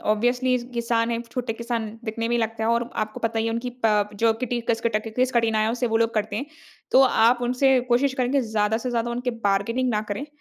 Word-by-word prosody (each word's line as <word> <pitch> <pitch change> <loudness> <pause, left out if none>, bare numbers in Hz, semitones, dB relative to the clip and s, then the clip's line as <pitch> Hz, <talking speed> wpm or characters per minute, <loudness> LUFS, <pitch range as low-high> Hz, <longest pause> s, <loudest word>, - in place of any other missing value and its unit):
Obviously 245 +4 +2 0.2
किसान 230 0 0
है, 235 0 -1
छोटे 235 0 -4
किसान 230 -1 -3 0.2
दिखने 230 +1 -3
में 240 - +1
ही 240 - +2
लगते 225 0 -3
हैं 225 - +2
और 235 0 0
आपको 215 0 -3
पता 225 0 -1
ही 225 - 0
है 225 - 0
उनकी 235 +2 -3
प 210 -2 +3
जो 225 +2 +3
किटी 240 +1 -3
कस 230 -1 +1
के 230 - +1
टकी 215 0 -2
किस 255 0 +2
कठिनाइयों 225 -1 +2
से 245 0 -1
वो 225 -1 +1
लोग 230 0 +1
करते 210 -1 -1
हैं। 275 +6 -3 0.4
तो 265 - +6
आप 240 0 +4
उनसे 255 +2 +3
कोशिश 260 +3 +2
करेंगे 260 +1 +1
ज़्यादा 220 -2 0
से 250 +2 -4
ज़्यादा 240 0 -1
उनके 245 +1 -2 0.2
बार्गेनिंग 230 +6 0
ना 210 -2 +1
करे 235 +8 -3
230 Hz, 235 wpm, -24 LUFS, 220-245 Hz, 0.4 s, तो